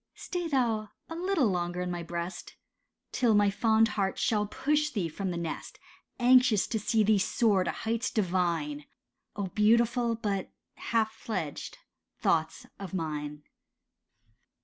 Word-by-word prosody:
Stay 355 -1 -4
thou 230 -7 0 0.2
a 330 - -5
little 360 -4 +1
longer 175 -3 -1
in 180 0 -2
my 175 -1 -3
breast, 170 +2 -6 0.6
Till 235 -4 +2
my 205 -1 +4
fond 220 +2 +3
heart 195 -2 -1
shall 210 -2 +1
push 300 +7 0
thee 205 - -2
from 190 +4 -4
the 175 - -3
nest 170 -1 -5 0.4
Anxious 250 -4 +5
to 220 - -2
see 215 +1 +2
thee 210 0 +4
soar 200 -1 +2
to - - -2
heights 230 +2 -2
divine— 170 -7 -1 0.5
Oh, 200 - -2
beautiful 235 +3 +3
but 200 -4 -2 0.2
half 220 -1 0
fledged 210 -10 -5 0.4
thoughts 160 -1 0
of 195 -1 -6
mine. 150 -3 -4
210 Hz, 140 wpm, -29 LUFS, 175-230 Hz, 0.6 s, Anxious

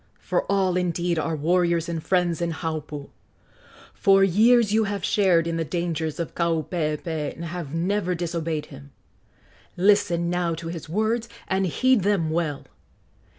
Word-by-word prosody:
for - - -1
all, 190 -2 +2
indeed, 175 -1 0
are 160 +1 -1
warriors 170 +2 +1
and 165 -2 -4
friends 175 -3 +1
in 170 - 0
Haupu! 155 -3 -5 0.8
for 195 0 +4
years 215 +3 +4
you 220 0 +3
have 200 0 -3
shared 180 -5 +3
in 165 0 -2
the 165 - 0
dangers 160 -2 -3
of 170 - -4
Kaupeepee 160 -2 -2
and 170 - -7
have 165 -3 -5
never 180 +2 0
disobeyed 165 -2 -3
him. 140 +1 -12 0.9
Listen 175 -3 +3
now 175 -1 0
to 165 0 -6
his 165 -2 -7
words, 220 +5 0 0.2
and 190 0 +1
heed 255 +6 +2
them 185 -5 +1
well. 160 -4 -2
170 Hz, 150 wpm, -24 LUFS, 160-190 Hz, 0.9 s, for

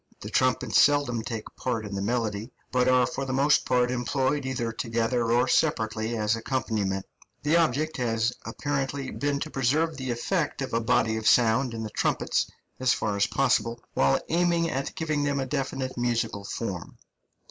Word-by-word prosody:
The - - -7
trumpets - - +3
seldom 140 -5 +3
take 115 -1 -6
part 115 -4 -2
in 100 - -6
the 100 - -2
melody, 110 +1 -2 0.2
but 125 -1 +2
are 130 -1 +5
for 135 +2 -4
the 130 -1 -3
most 140 +3 +3
part 125 -1 +2
employed 130 +3 0
either 120 -3 -2
together 115 +1 0
or 120 +2 +3
separately 110 -6 +1
as 105 +1 +1
accompaniment; 110 -5 -2 0.4
the 150 +3 +3
object 155 -1 +1
has 115 -1 0
apparently 135 +2 -3
been 145 0 -1
to 155 - -4
preserve 150 +5 +1
the 130 -1 -4
effect 140 +5 -1
of 130 - -6
a 115 - +2
body 115 -1 +2
of 110 - -2
sound 120 +1 +4
in 110 - -4
the 110 - -5
trumpets - - 0 0.3
as 130 -1 +3
far 105 -2 -1
as 100 - +2
possible, 115 -4 +1
while 70 0 +3
aiming 170 0 +2
at 135 +1 -3
giving 155 -4 -1
them 145 -1 0
a 135 - -1
definite 135 -1 -3
musical 115 -4 -1
form. 100 -5 -5
125 Hz, 175 wpm, -27 LUFS, 115-140 Hz, 0.4 s, are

